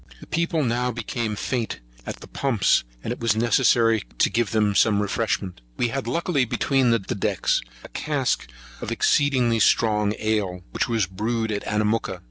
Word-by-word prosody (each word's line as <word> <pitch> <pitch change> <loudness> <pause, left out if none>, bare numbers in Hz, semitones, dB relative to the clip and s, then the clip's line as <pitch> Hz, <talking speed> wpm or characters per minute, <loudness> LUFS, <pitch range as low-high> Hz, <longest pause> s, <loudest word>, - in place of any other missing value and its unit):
The - - -12
people 165 -1 0
now 125 0 0
became 120 -2 -3
faint 120 +2 -3 0.3
at - - -6
the - - -10
pumps, 125 -8 +1 0.2
and 120 - -2
it - - -10
was 115 -3 +1
necessary 115 -1 +3 0.2
to - - +3
give 115 -3 +1
them 105 -2 +1
some 105 0 +3
refreshment. 100 - -2 0.2
We 120 - +1
had 130 0 -3
luckily 145 +2 +1
between 130 +1 +1
decks 95 - 0 0.2
a - - -11
cask 140 - -1 0.3
of - - -4
excellent 125 -6 +2
strong 105 -2 +3
ale, 105 -5 -1
which - - -1
we 115 -1 0
brewed 110 +4 -2
at 105 - -2
Anamooka. 105 +1 0
115 Hz, 160 wpm, -24 LUFS, 105-125 Hz, 0.3 s, necessary